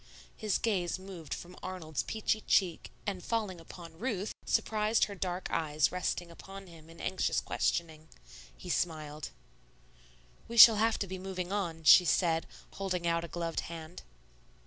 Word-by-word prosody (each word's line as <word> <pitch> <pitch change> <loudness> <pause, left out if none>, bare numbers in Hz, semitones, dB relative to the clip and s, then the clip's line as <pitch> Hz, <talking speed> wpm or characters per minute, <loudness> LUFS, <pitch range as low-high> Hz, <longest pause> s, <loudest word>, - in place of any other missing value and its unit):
His 215 -2 0
gaze 190 -7 0
moved 185 -4 -10
from 180 +1 -6
Arnold's 165 -5 -4
peachy 215 0 -1
cheek, 180 -4 +2 0.2
and 195 -4 -3
falling 210 -7 -2
upon 165 -1 -12
Ruth, 215 -4 -2 0.2
surprised 215 +1 +2
her 205 - 0
dark 180 -1 -3
eyes 155 -2 +1
resting 180 -1 -2
upon 195 +3 -10
him 165 -3 -15
in 165 - -14
anxious 190 - 0
questioning. 160 -2 -2 0.5
He 180 - -6
smiled. 155 -3 -2 1.2
"We 235 - -6
shall 225 -1 +11
have 225 +1 +2
to 200 - -3
be 185 0 -6
moving 185 -1 -4
on," 170 -5 -2
she 180 +3 +9
said, 165 -1 +2 0.2
holding 185 -3 -3
out 170 0 +1
a - - -5
gloved 170 -1 -3
hand. 165 +1 -8
180 Hz, 150 wpm, -31 LUFS, 165-195 Hz, 1.2 s, shall